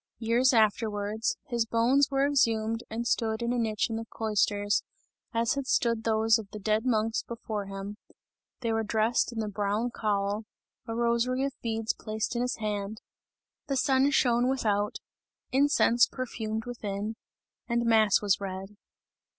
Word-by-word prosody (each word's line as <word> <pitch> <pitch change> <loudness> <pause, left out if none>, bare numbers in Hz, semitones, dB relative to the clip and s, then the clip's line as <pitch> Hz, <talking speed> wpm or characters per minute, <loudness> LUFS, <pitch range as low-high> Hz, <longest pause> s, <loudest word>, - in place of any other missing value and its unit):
Years 235 +3 +3
afterwards, 215 -1 +1
his 240 -5 -1
bones 250 +5 +3
were 275 0 +2
exhumed 230 -5 +1
and 230 +2 -3
stood 225 -1 0
in 235 +1 0
a 245 - 0
niche 220 -2 0
in 225 -2 -3
the 225 - -5
cloisters, 205 -1 +1 0.5
as 230 -1 +1
had 275 -1 -4
stood 230 -3 +1
those 225 0 +3
of 210 -3 -9
the 210 - -8
dead 215 +3 0
monks 225 -1 +1
before 215 -3 -5
him; 195 +1 -6 0.6
they 230 -2 0
were 225 - +1
dressed 220 +3 +1
in 235 - -8
the 220 -1 -1
brown 210 +3 -1
cowl, 205 -1 -1 0.4
a 225 - -3
rosary 235 +2 +1
of 275 -1 -1
beads 225 -1 -1
placed 215 +2 -4
in 240 - 0
his 250 0 -1
hand, 210 0 -3 0.7
the 275 -2 0
sun 265 +1 +3
shone 245 -3 +3
without, 210 -6 0 0.6
incense 260 -3 +4
perfumed 220 -4 -4
within, 215 -3 -4 0.5
and 235 0 0
mass 220 -3 +4
was 200 -1 +2
read. 195 +1 -6
225 Hz, 155 wpm, -28 LUFS, 215-240 Hz, 0.7 s, incense